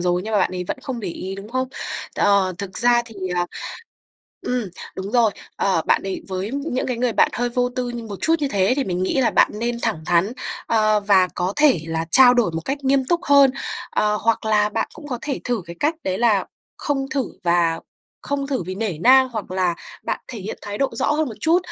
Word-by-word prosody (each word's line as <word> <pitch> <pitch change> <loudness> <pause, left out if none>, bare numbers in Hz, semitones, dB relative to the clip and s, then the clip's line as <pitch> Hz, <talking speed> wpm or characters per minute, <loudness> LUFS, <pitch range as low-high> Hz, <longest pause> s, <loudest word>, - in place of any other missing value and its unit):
rồi 180 0 +1
nhưng 220 - -4
mà 210 - +3
bạn - - +2
ấy 180 - -3
vẫn - - -2
không 260 -4 -4
để 195 - -4
ý, 190 +3 -5
đúng 195 +2 -9
không? 260 +1 -1 0.5
Ờ, 200 -2 +3
thực 195 -2 -4
ra 240 0 +4
thì, 225 - -12 0.2
ờ, 175 0 +1 1.0
ừm, 250 -2 0 0.3
đúng 195 +2 -5
rồi, 235 -3 +4 0.3
ờ, 185 -5 +1
bạn - - +3
ấy 195 -1 -4
với 190 +2 -3
những 280 -2 -2
cái 250 -2 -1
người 245 -1 0
bạn - - +4
hơi 245 +1 0
vô 245 +1 0
tư 250 -1 -1
như 240 -1 -5
một 205 -3 -6
chút 325 - +3
như 285 - 0
thế 195 +1 +2
thì 280 - 0
mình 180 -1 -2
nghĩ 225 +8 +1
là 245 - +3
bạn - - +4
nên 235 +1 -1
thẳng 215 -9 -1
thắn, 175 +6 +2 0.3
ờ, 215 -2 +3
và 195 -3 +4
có 180 +2 -1
thể 295 - +5
là 165 0 -2
trao 250 +2 +7
đổi 240 -7 +2
một 165 0 -3
cách 275 +6 -2
nghiêm 270 0 +3
túc 340 +5 +1
hơn, 280 -1 +6 0.4
ờ, 210 0 +1
hoặc 230 0 +1
là 210 -1 +3
bạn - - -2
cũng 310 -2 -11
có 245 -3 -3
thể 280 -3 -3
thử 240 -6 -1
cái 170 - -9
cách 305 +3 +2
đấy 190 0 -1
là 220 -5 +3 0.3
không 270 -2 -1
thử 275 -4 0 0.2
và 170 -1 +2 0.4
không 280 -1 -2
thử 265 -9 -1
vì 185 +2 -5
nể 195 -6 -2
nang 260 +5 +6
hoặc 220 -6 -6
là 185 -2 +1 0.3
bạn - - -2
thể 235 - -6
hiện 195 +3 -6
thái 205 0 -5
độ 275 - +2
rõ - - 0
hơn 305 -2 0
một 220 - -7
chút, 330 +3 +4
225 Hz, 240 wpm, -22 LUFS, 190-260 Hz, 1.0 s, trao